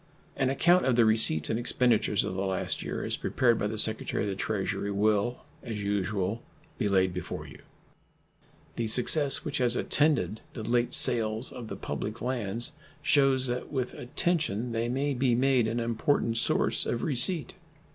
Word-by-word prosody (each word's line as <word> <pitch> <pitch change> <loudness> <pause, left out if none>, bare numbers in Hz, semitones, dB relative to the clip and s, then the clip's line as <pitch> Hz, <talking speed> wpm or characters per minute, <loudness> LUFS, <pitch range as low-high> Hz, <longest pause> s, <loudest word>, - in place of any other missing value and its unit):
An 135 -2 0
account 175 +7 +3
of 130 - +2
the 120 -1 +4
receipts 110 -8 +4
and 110 - -1
expenditures 120 -4 +1
of - - -4
the 95 - -3
last 95 -1 -2
year, - - -5
as - - 0
prepared 120 -3 +1
by 105 - -1
the 110 +1 -5
Secretary 110 +1 +2
of 105 - -2
the 95 - -3
Treasury, 100 0 -3
will, 105 +3 0 0.2
as 105 -3 -6
usual, 100 +1 -2 0.4
be 105 - 0
laid 95 -2 +1
before 90 - -6
you. - - -13 1.2
The 115 - -2
success 135 +7 +4
which 145 -3 -3
has 120 -1 +2
attended 130 - 0
the 110 - -7
late 120 +1 0
sales 115 -1 +4
of 120 -3 -8
the - - -6
public 110 +2 -6
lands 120 +1 0 0.3
shews 135 -3 +3
that 125 +1 -4
with 130 -3 -3
attention 125 - -2
they 115 +1 -2
may 140 +3 -1
be 125 -2 +1
made 130 -2 +2
an 115 +2 -2
important 115 0 -1
source - - +1
of 115 - -3
receipt. 150 +4 +1
120 Hz, 170 wpm, -27 LUFS, 105-130 Hz, 1.2 s, the